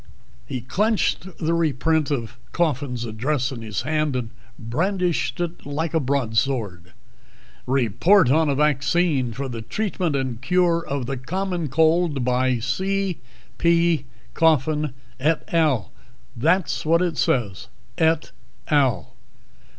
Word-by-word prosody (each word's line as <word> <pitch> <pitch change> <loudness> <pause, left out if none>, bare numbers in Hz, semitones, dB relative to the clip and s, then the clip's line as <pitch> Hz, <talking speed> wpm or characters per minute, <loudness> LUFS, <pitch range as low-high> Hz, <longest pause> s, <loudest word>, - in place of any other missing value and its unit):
He 130 - -4
clenched 200 - 0
the 165 +1 0
reprint 160 -1 +1
of 120 -5 -3
Coffin's 140 -7 -1
address 125 +5 -1
in 120 -4 -7
his 110 -3 -4
hand 155 -2 0
and 120 -3 -3 0.3
brandished 175 - -1
it 175 0 -3
like 150 +3 -3
a 160 - +3
broadsword. 115 - -1 0.7
"'Report 135 - +3
on 155 +1 +3
a 140 - +1
Vaccine 150 -2 +1
for 135 +5 -4
the 120 -3 -5
Treatment 180 - -2
and 130 -4 -2
Cure 170 +4 +2
of 140 -4 -3
the 135 +2 -3
Common 175 +5 -3
Cold,' 160 -1 +2
by 125 0 +2
C. 190 - -1 0.4
P. 170 -3 +2 0.3
Coffin, 155 -2 +2 0.2
et 155 +4 0
al. 150 - +2 0.4
That's 165 +9 +1
what 165 +3 +3
it 170 -3 -1
says 110 -7 0 0.3
_et 160 0 +2 0.4
al. 130 - +1
145 Hz, 125 wpm, -23 LUFS, 125-165 Hz, 0.7 s, a